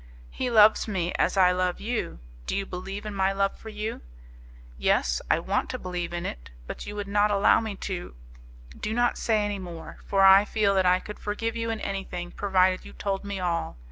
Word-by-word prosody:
"He 255 Hz, -, -2 dB
loves 220 Hz, -2 st, +5 dB
me 180 Hz, -4 st, -1 dB
as -, -, +1 dB
I 180 Hz, -1 st, +6 dB
love 180 Hz, 0 st, 0 dB
you; 230 Hz, -, -3 dB, 0.3 s
do -, -, -1 dB
you 195 Hz, -, -1 dB
believe 195 Hz, +3 st, -6 dB
in 210 Hz, -, -4 dB
my 195 Hz, 0 st, +1 dB
love 195 Hz, 0 st, 0 dB
for 220 Hz, -, -9 dB
you?" 215 Hz, +1 st, -5 dB, 0.7 s
"Yes, 60 Hz, -1 st, +1 dB
I -, -, +4 dB
want -, -, -1 dB
to -, -, -3 dB
believe 180 Hz, -2 st, -4 dB
in 175 Hz, +1 st, -4 dB
it; -, -, -6 dB, 0.2 s
but -, -, -7 dB
you 205 Hz, -, -6 dB
would 205 Hz, -1 st, -4 dB
not 205 Hz, +1 st, +3 dB
allow 200 Hz, -1 st, +4 dB
me 220 Hz, -3 st, -4 dB
to...." 185 Hz, -, -6 dB, 0.6 s
"Do 215 Hz, +1 st, -3 dB
not 240 Hz, 0 st, +2 dB
say 215 Hz, -2 st, +1 dB
any 205 Hz, -1 st, -3 dB
more; 175 Hz, -3 st, -9 dB
for 195 Hz, -1 st, +3 dB
I 195 Hz, +1 st, +8 dB
feel 210 Hz, -1 st, +1 dB
that 190 Hz, -1 st, +3 dB
I 180 Hz, +1 st, +4 dB
could 210 Hz, -, -9 dB
forgive 225 Hz, +2 st, -3 dB
you 230 Hz, 0 st, -2 dB
in 225 Hz, -1 st, -2 dB
anything, 180 Hz, -3 st, -4 dB
provided 185 Hz, -2 st, +2 dB
you -, -, -12 dB
told 195 Hz, -1 st, -3 dB
me 200 Hz, -1 st, -4 dB
all. 170 Hz, -, -2 dB
195 Hz, 210 wpm, -26 LUFS, 180-210 Hz, 0.7 s, I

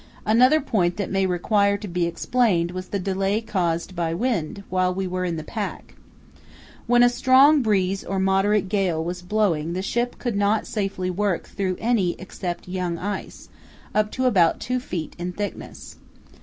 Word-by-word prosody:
Another 250 Hz, +8 st, +5 dB
point 180 Hz, -, 0 dB
that 200 Hz, -, -3 dB
may 195 Hz, 0 st, +1 dB
require 200 Hz, +3 st, +2 dB
to 205 Hz, 0 st, -7 dB
be 175 Hz, -1 st, 0 dB
explained 175 Hz, -1 st, +1 dB
was 185 Hz, 0 st, -6 dB
the 200 Hz, -, -2 dB
delay 195 Hz, +2 st, 0 dB
caused 185 Hz, -5 st, -2 dB
by 165 Hz, -1 st, -1 dB
wind 200 Hz, -4 st, -2 dB
while 185 Hz, 0 st, +1 dB
we 190 Hz, +1 st, -2 dB
were 185 Hz, 0 st, -2 dB
in 170 Hz, -2 st, -2 dB
the 155 Hz, -, -5 dB
pack. 215 Hz, +2 st, -5 dB, 0.9 s
When 240 Hz, +1 st, +5 dB
a -, -, +7 dB
strong 260 Hz, +4 st, +5 dB
breeze 195 Hz, -4 st, +1 dB
or 195 Hz, -, -3 dB
moderate 195 Hz, +2 st, +2 dB
gale 185 Hz, -5 st, 0 dB
was 175 Hz, +2 st, -4 dB
blowing 180 Hz, -5 st, 0 dB
the 185 Hz, +1 st, -3 dB
ship 240 Hz, +4 st, -1 dB
could 240 Hz, -4 st, -3 dB
not 205 Hz, +2 st, +1 dB
safely 195 Hz, -3 st, -2 dB
work 195 Hz, -1 st, -1 dB
through 190 Hz, -2 st, -2 dB
any 220 Hz, -7 st, +1 dB
except 180 Hz, -2 st, -6 dB
young 180 Hz, -2 st, -2 dB
ice, 205 Hz, +4 st, -6 dB, 0.4 s
up 210 Hz, 0 st, +2 dB
to 260 Hz, -, -1 dB
about 180 Hz, -9 st, +3 dB
two 250 Hz, +1 st, -1 dB
feet 175 Hz, -10 st, -5 dB
in 180 Hz, +1 st, -4 dB
thickness. 205 Hz, +2 st, -7 dB
195 Hz, 170 wpm, -23 LUFS, 180-215 Hz, 0.9 s, a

